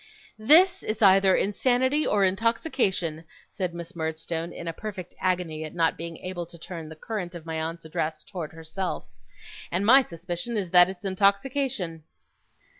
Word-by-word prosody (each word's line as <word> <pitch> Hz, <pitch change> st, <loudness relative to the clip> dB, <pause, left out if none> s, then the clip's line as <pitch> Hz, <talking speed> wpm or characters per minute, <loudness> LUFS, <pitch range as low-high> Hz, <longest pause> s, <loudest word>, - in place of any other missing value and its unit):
'This 355 Hz, -, +6 dB
is 215 Hz, 0 st, -3 dB
either 195 Hz, -1 st, +6 dB
insanity 260 Hz, +7 st, +1 dB
or 205 Hz, -1 st, +2 dB
intoxication,' 190 Hz, -, 0 dB, 0.3 s
said 185 Hz, -3 st, -2 dB
Miss 170 Hz, +2 st, -8 dB
Murdstone, 160 Hz, +1 st, -3 dB
in 170 Hz, -, -8 dB
a 165 Hz, -, -2 dB
perfect 190 Hz, -2 st, -7 dB
agony 175 Hz, -4 st, -1 dB
at 155 Hz, +2 st, -8 dB
not 165 Hz, -1 st, +2 dB
being 165 Hz, 0 st, -7 dB
able 175 Hz, -2 st, -4 dB
to 170 Hz, -, -12 dB
turn 165 Hz, -2 st, -8 dB
the 160 Hz, -, -9 dB
current 180 Hz, 0 st, -5 dB
of 165 Hz, -2 st, -9 dB
my 160 Hz, -1 st, -3 dB
aunt's 165 Hz, +1 st, -5 dB
address 155 Hz, 0 st, -3 dB
towards 165 Hz, -5 st, -7 dB
herself; 165 Hz, +4 st, -4 dB, 0.7 s
'and 185 Hz, +4 st, 0 dB
my 260 Hz, +5 st, +8 dB
suspicion 175 Hz, +3 st, -4 dB
is 185 Hz, -4 st, -2 dB
that 180 Hz, 0 st, +8 dB
it's 190 Hz, +1 st, -8 dB
intoxication. 200 Hz, -, 0 dB
180 Hz, 160 wpm, -26 LUFS, 165-210 Hz, 0.7 s, my